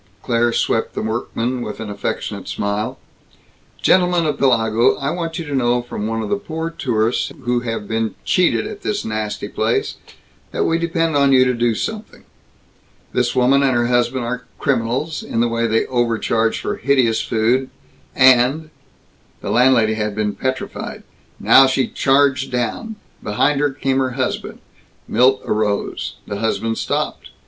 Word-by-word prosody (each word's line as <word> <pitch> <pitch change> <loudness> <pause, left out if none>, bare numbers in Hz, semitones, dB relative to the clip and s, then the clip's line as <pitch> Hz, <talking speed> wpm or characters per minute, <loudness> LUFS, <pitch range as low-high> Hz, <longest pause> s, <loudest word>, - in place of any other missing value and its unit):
Claire 120 0 +1
swept 115 -1 0
the - - -2
workmen 120 +2 -2
with 105 -3 -6
an 110 - -5
affectionate 100 - -4
smile. 100 +1 -2 0.9
"Gentlemen 180 -2 +3
of 150 - -1
Pellago, 115 -3 +3
I 140 +1 -1
want 165 -1 -3
you 165 - -4
to 145 - -5
know 120 -2 +1
from 110 -3 -5
one 115 0 -2
of - - -5
the 205 - +1
poor 165 -4 -5
tourists 115 -6 0
who 120 0 +1
have 115 -3 -4
been 110 0 -2
cheated 120 -12 +2
at - - -7
this 105 - -2
nasty 110 -1 -3
place - - -1 0.5
that - - -1
we 165 0 +1
depend 165 -1 0
on 140 -1 +4
you 130 -1 +6
to 125 - +2
do 120 -1 +1
something. 215 - -5 0.9
This 125 0 0
woman 130 +2 +4
and 135 -2 +2
her 120 0 +2
husband 120 +1 +1
are 125 0 -4
criminals, 135 +4 -1
in 115 - -3
the 120 - +3
way 115 0 0
they 110 0 +1
overcharge 115 -2 0
for - - -3
hideous 125 -3 +2
food 120 +4 +1 0.5
and 130 +4 +4 0.3
" - - -36
The - - -3
landlady 120 -3 +4
had 105 -1 -2
been 105 -1 -1
petrified. 130 0 -4 0.4
Now 135 - +7
she 130 0 +1
charged 135 -1 +2
down. 125 - -2 0.3
Behind 140 +7 +1
her 145 0 +2
came 135 -1 -1
her 130 -1 0
husband. 130 - -3 0.5
Milt 130 +2 +3
arose. 105 -1 -1
The 100 - -5
husband 115 +1 -1
stopped. - - -2
125 Hz, 160 wpm, -19 LUFS, 115-135 Hz, 0.9 s, Now